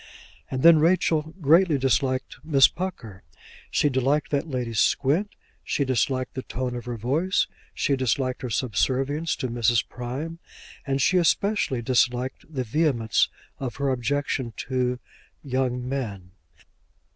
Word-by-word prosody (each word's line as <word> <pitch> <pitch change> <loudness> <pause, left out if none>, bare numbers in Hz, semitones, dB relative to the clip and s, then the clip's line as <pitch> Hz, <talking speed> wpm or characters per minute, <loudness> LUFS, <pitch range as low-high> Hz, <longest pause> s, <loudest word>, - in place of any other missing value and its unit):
And 130 0 -3
then 165 -1 +8
Rachel 160 -1 +2
greatly 165 +1 +5
disliked 130 0 0
Miss 140 -4 +6
Pucker. 120 - -6 0.5
She - - +2
disliked 140 +2 +1
that 145 +2 0
lady's 120 -6 -2
squint, 155 +10 +2 0.3
she 140 - -1
disliked 130 0 0
the 130 - -4
tone 125 -1 -4
of 120 - -6
her 120 -1 -4
voice, 150 - +1 0.3
she 140 - +1
disliked 130 0 -1
her 125 - -4
subservience 135 - 0
to 130 - -3
Mrs. 120 -1 +1
Prime, 135 +7 -6 0.5
and 135 0 0
she 185 - +3
especially 175 - +1
disliked 125 +3 0
the 130 -4 -2
vehemence 120 -3 +1 0.3
of 130 -4 -4
her 140 -1 -1
objection 130 -1 -1 0.2
to 125 -1 0 0.5
young 125 -2 -1
men. 105 -9 -4
130 Hz, 135 wpm, -25 LUFS, 125-150 Hz, 0.5 s, then